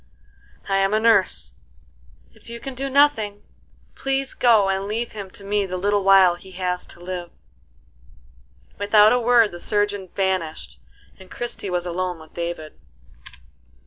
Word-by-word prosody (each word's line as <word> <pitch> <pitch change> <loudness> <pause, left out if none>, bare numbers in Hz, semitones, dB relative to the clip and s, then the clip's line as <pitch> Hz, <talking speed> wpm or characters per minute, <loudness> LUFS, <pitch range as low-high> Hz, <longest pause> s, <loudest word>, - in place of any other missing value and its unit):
"I 195 - +1
am 195 +2 +2
a - - +3
nurse. 185 - +2 0.8
If - - -17
you 235 0 -7
can 270 +2 -7
do 270 +2 -4
nothing, 260 -8 +2 0.5
please 270 0 -1
go 225 -5 +4
and 195 0 -1
leave 230 +3 -3
him 200 -3 -8
to 200 - -11
me 200 0 0
the 185 0 -4
little 205 +2 0
while 190 -2 +6
he 190 +1 -14
has 180 -1 -3
to - - -14
live." 175 -1 -6 1.5
Without 210 +2 +5
a 250 - +2
word 235 -2 +4
the 175 - -9
surgeon 205 -1 -1
vanished, 185 - -2 0.4
and 190 -1 -14
Christie 240 -4 -5
was 180 -1 -2
alone 180 0 -3
with 160 -1 -16
David. 170 - -6
195 Hz, 150 wpm, -22 LUFS, 180-220 Hz, 1.5 s, while